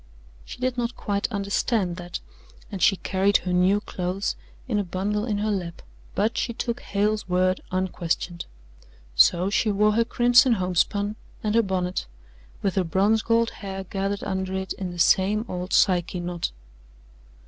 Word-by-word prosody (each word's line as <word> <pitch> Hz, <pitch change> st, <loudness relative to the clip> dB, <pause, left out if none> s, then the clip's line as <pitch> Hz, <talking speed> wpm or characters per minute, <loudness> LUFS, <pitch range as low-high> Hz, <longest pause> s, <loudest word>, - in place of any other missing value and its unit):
She -, -, -9 dB
did 250 Hz, 0 st, -1 dB
not 240 Hz, +1 st, -2 dB
quite 200 Hz, +3 st, -2 dB
understand 200 Hz, -2 st, 0 dB
that, 175 Hz, -1 st, -6 dB, 0.5 s
and 195 Hz, -3 st, -5 dB
she 195 Hz, -, +5 dB
carried 195 Hz, +2 st, +2 dB
her 180 Hz, -, 0 dB
new 185 Hz, +3 st, +3 dB
clothes 185 Hz, +1 st, -3 dB, 0.3 s
in 215 Hz, -5 st, 0 dB
a -, -, +1 dB
bundle 200 Hz, +4 st, -2 dB
in 210 Hz, -4 st, -1 dB
her 210 Hz, +1 st, 0 dB
lap, 175 Hz, -4 st, -4 dB, 0.3 s
but 215 Hz, +3 st, +1 dB
she 235 Hz, -, -1 dB
took 235 Hz, +1 st, -2 dB
Hale's 210 Hz, 0 st, -1 dB
word 185 Hz, +1 st, +2 dB
unquestioned. 175 Hz, -2 st, -2 dB, 0.7 s
So 180 Hz, -, +5 dB
she 215 Hz, -, +2 dB
wore 210 Hz, +1 st, +3 dB
her 230 Hz, +2 st, +3 dB
crimson 245 Hz, +2 st, +5 dB
homespun 200 Hz, +2 st, 0 dB, 0.3 s
and 210 Hz, -1 st, 0 dB
her 230 Hz, -, +5 dB
bonnet, 185 Hz, -, -2 dB, 0.6 s
with 195 Hz, -, +1 dB
her 190 Hz, -, +1 dB
bronze 195 Hz, +6 st, +2 dB
gold 230 Hz, 0 st, +2 dB
hair 195 Hz, -1 st, -6 dB
gathered 195 Hz, +1 st, -3 dB
under 190 Hz, 0 st, -2 dB
it 190 Hz, 0 st, -3 dB
in 185 Hz, -2 st, -5 dB
the 175 Hz, -, -8 dB
same 200 Hz, +5 st, +3 dB
old 180 Hz, +1 st, -5 dB
Psyche 180 Hz, -1 st, +3 dB
knot. 175 Hz, -1 st, -3 dB
195 Hz, 160 wpm, -25 LUFS, 180-215 Hz, 0.7 s, she